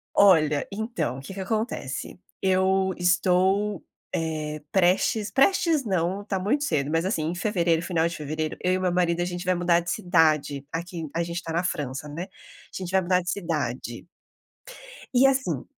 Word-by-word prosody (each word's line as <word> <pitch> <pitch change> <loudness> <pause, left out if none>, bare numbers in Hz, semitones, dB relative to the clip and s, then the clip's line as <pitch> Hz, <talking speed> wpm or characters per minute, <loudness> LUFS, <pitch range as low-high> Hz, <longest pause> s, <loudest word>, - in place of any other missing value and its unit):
Olha, 155 -7 +5
então, 220 - -3
que 140 - -9
que 195 - -8
acontece. 195 - -3 0.2
Eu 190 0 +2
estou, 185 +2 +2 0.3
eh, 155 -2 -3
prestes 195 +3 +2
prestes 320 +1 +3
não, 190 -1 0
está 200 -2 -3
muito 250 +10 0
cedo, 145 - 0
mas 165 +2 +1
assim, 185 -5 0
em 165 +3 -2
fevereiro, 175 -4 +1
final 170 -2 +1
de 170 - -5
fevereiro, 155 +1 -3
eu 180 - +2
e 185 - +1
meu 185 -1 +1
marido 175 -1 +1
a - - +1
gente 175 +1 -5
vai 185 - +3
mudar 175 -1 +3
de 175 - -4
cidade, 155 -7 +2
aqui 170 -1 -5
a 170 - +1
gente 170 0 -5
está 170 -2 -5
na 170 +2 +1
França 145 -5 -3
né, 160 +4 -5
a 190 +1 -16
gente 185 -2 -5
vai 190 0 +3
mudar 180 0 +2
de 180 - -2
cidade. 140 -9 -3 1.1
E 255 +2 +5
assim 270 -1 0
175 Hz, 175 wpm, -25 LUFS, 160-190 Hz, 1.1 s, Olha